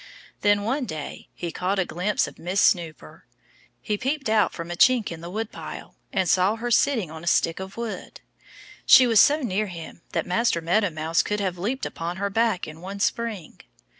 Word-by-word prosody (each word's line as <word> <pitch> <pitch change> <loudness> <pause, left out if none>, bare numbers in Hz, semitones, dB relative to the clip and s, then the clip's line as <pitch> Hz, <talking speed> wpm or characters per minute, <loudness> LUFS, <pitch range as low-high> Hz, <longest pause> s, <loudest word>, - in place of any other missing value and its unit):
Then, 205 0 +3
one 260 +5 -1
day, 155 -9 -7
he 170 -1 -4
caught 185 +4 -1
a 190 - +1
glimpse 185 +5 0
of - - -12
Miss 180 +3 -1
Snooper. 160 - 0 0.6
He 210 -1 -2
peeped 270 -1 -2
out 220 -1 +3
from 170 0 -7
a - - -3
chink 245 +1 +4
in 165 -1 -7
the 170 - -7
woodpile 220 +4 -6 0.2
and 190 -2 0
saw 185 +5 +3
her 240 +2 -4
sitting 225 - +2
on 160 0 -9
a - - -8
stick 165 0 +2
of 190 +2 -8
wood. 235 -1 -6 0.7
She 255 - +9
was 225 -3 +4
so 295 +2 +5
near 210 -2 -1
him 170 -2 -9
that - - 0
Master 185 0 +1
Meadow 185 +5 +1
Mouse 160 +1 0
could 210 0 -2
have 185 -3 -2
leaped 240 +9 -2
upon 170 +2 -5
her 200 +1 -2
back 225 -3 +1
in 155 +1 -10
one 195 +2 -7
spring. 215 -4 -2
195 Hz, 195 wpm, -24 LUFS, 170-225 Hz, 0.7 s, She